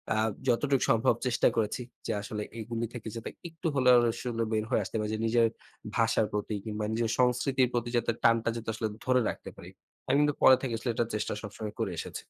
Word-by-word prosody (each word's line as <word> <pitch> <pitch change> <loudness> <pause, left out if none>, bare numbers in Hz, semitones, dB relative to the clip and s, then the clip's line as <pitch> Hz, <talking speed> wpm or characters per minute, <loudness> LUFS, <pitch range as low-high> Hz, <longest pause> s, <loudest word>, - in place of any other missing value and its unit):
আ - - 0 0.3
যতটুক 135 +2 +2
সম্ভব 115 0 +4
চেষ্টা 120 - +3
করেছি 110 +2 0 0.3
যে - - 0
আসলে 105 0 -4 0.2
এগুলি 115 +1 -3
থেকে 115 -2 -7
যাতে 115 - -5 0.2
একটু 165 +1 -5
হলেও 125 -2 +6 0.2
আসলে 115 -1 -2
বের 110 -1 0
হয়ে - - +2
আসতে 95 - -8
পারি 105 0 -2
যে - - -5
নিজের 115 0 +4 0.5
ভাষার 115 -1 +3
প্রতি 105 +1 -2
কিংবা 105 0 -3
নিজের 115 0 0
সংস্কৃতির 125 +1 +3
প্রতি 120 0 -1
যাতে 115 0 +1
টানটা 115 -1 +4
যাতে 115 -1 -5
আসলে 110 0 -2 0.2
ধরে 125 -1 +3
রাখতে - - -6
পারি। - - -10 0.4
আমি 135 +2 +3
কিন্তু 145 -1 +2
পরে 130 - +9
থেকে 125 -4 -2
আসলে 120 +2 -4
এটা 120 - +1
চেষ্টা 105 - -2
সবসময় 105 0 -6
করে 110 -4 -1
এসেছি। - - -6
115 Hz, 205 wpm, -29 LUFS, 110-125 Hz, 0.5 s, পরে